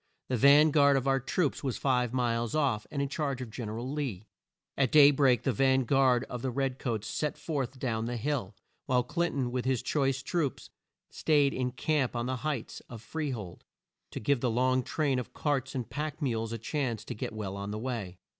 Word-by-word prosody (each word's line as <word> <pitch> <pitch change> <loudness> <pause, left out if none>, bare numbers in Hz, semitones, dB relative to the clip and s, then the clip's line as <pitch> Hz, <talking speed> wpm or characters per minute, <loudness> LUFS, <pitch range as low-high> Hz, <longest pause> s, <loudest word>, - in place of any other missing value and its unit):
The 130 - +1
van 145 +5 +6
guard 140 -2 +5
of 135 0 -1
our 135 0 +3
troops 145 +4 -1
was 130 -4 -1
five 125 -3 +1
miles 120 0 0
off, 130 -9 +1
and 140 -1 -2
in - - -1
charge 140 -2 -2
of 125 -3 -6
Gen 110 -1 -5
er 110 - -5
al 125 +3 -4
Lee. 130 -10 -3 0.5
At 135 -3 +1
day 145 -1 +8
break 135 -3 +3
the 135 - +2
van 130 +3 +3
guard 130 -1 +3
of 125 - -6
the 130 - -1
red 135 +1 -2
coats 110 -5 -2
set 150 -1 -2
forth 140 -4 -3
down 115 -4 -2
the 120 +1 -3
hill, 115 -5 -2 0.3
while 125 -1 +3
Clin 170 +7 0
ton 130 -3 -1
with 125 0 -2
his 130 -3 0
choice 135 -2 0
troops 150 -5 -2 0.4
staid 145 -3 +2
in 125 -1 -2
camp 135 -1 0
on 120 0 -1
the 130 0 -2
heights 140 -3 -3
of 120 - -8
Free 150 +6 -4
hold, 105 -9 -6 0.5
to - - -6
give 135 +3 +1
the 125 - +1
long 130 +2 +2
train 140 0 0
of 125 - -7
carts 135 -3 -1
and 125 -3 -3
pack 150 +1 -4
mules 115 -6 -1
a 115 - -3
chance 115 -2 -3
to - - -5
get - - -4
well 105 -3 -5
on 100 0 -5
the 105 - -3
way. 110 -7 -4
130 Hz, 220 wpm, -30 LUFS, 120-140 Hz, 0.5 s, day